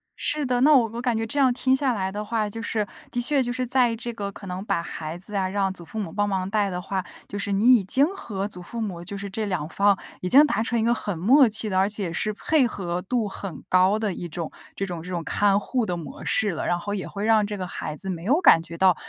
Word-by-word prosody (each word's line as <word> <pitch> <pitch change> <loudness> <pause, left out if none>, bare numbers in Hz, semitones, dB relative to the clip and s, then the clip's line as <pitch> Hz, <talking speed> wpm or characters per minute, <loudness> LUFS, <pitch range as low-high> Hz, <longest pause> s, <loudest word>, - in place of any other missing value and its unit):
是 295 -1 -1
的， 250 -1 +1
那 300 +3 +6
我 235 -3 +5
我 235 - -4
感 240 -3 0
觉 225 - -1
这 285 +6 -3
样 260 -2 +5
听 260 +1 +2
下 265 -2 +1
来 190 -2 -2
的 210 +1 -4
话， 215 -1 -1
就 225 +2 -7
是 215 -3 -1 0.2
的 245 - -2
确 275 +3 +3
就 245 -1 -1
是 255 0 -2
在 245 -2 +3
这 235 +1 -6
个 200 -2 -4
可 195 - -11
能 185 +1 -5
把 170 - 0
孩 160 0 -6
子 195 +3 -5
啊， 190 -1 0
让 195 -1 0
祖 175 - -5
父 220 - -9
母 180 -6 -4
帮 205 0 0
忙 190 -1 -1
带 205 -1 +1
的 180 -1 -3
话， 190 0 -3 0.2
就 205 - -6
是 200 - -3
你 230 +6 +6
已 205 - +2
经 265 +9 +3
和 200 - -4
祖 180 -3 -9
父 230 +6 -7
母 185 -6 -4
就 200 +2 -6
是 200 0 -5
这 215 +2 -3
两 165 -6 -2
方 200 +2 +3 0.2
已 180 - -2
经 290 +4 +8
达 220 -7 0
成 235 0 0
一 - - +1
个 235 +1 +3
很 205 -6 -3
默 250 - +5
契 215 0 0
的， 185 -2 +1
而 195 - +3
且 195 -5 -2
是 215 - -1
配 270 +4 +2
合 180 -4 -3
度 230 +2 -1
很 190 -5 -7
高 185 +3 +4
的 215 -4 -1
一 175 -1 -6
种 165 0 -4 0.2
这 195 - -2
种 175 -3 -5
这 180 - -9
种 170 -2 -3
看 200 +2 +2
护 250 +3 -1
的 175 -3 -2
模 165 - -8
式 210 -3 +1
了。 160 - -4
然 175 - +1
后 205 +2 -4
也 190 - -3
会 205 +1 -4
让 220 -2 +4
这 205 -1 -4
个 185 - -4
孩 155 -3 -5
子 190 +4 -3
没 170 -2 -4
有 270 - +3
感 165 - +6
觉 170 0 -9
到 185 -1 +5
205 Hz, 305 characters per minute, -24 LUFS, 185-235 Hz, 0.2 s, 经